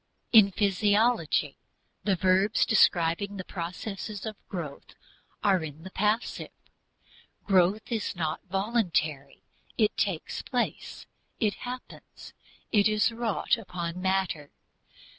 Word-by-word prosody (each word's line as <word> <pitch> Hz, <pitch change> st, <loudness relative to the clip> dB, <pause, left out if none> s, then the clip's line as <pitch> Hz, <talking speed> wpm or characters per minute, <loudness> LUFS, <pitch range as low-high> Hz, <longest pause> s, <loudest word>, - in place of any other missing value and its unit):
In 215 Hz, -4 st, +8 dB
physiology 205 Hz, -, +2 dB, 0.5 s
the 200 Hz, -2 st, +3 dB
verbs 190 Hz, +3 st, +3 dB
describing 195 Hz, -1 st, +3 dB
the 185 Hz, -, -4 dB
processes 195 Hz, +4 st, -5 dB
of 220 Hz, -1 st, -4 dB
growth 160 Hz, -7 st, -7 dB, 0.5 s
are 190 Hz, -5 st, +3 dB
in 155 Hz, 0 st, -8 dB
the 190 Hz, -, -9 dB
passive. 210 Hz, +4 st, -1 dB, 1.0 s
Growth 195 Hz, +3 st, +2 dB
is 220 Hz, -4 st, -2 dB
not 160 Hz, -2 st, -2 dB
voluntary; 180 Hz, -, -1 dB, 0.3 s
it 215 Hz, -2 st, +2 dB
takes 190 Hz, -7 st, -1 dB
place, 245 Hz, -1 st, -3 dB, 0.3 s
it 210 Hz, -3 st, +2 dB, 0.2 s
happens, 250 Hz, 0 st, -10 dB, 0.4 s
it 205 Hz, -2 st, +5 dB
is 215 Hz, +1 st, +2 dB
wrought 230 Hz, 0 st, 0 dB
upon 180 Hz, -4 st, -5 dB
matter. 190 Hz, -6 st, 0 dB
195 Hz, 105 wpm, -28 LUFS, 175-215 Hz, 1.0 s, In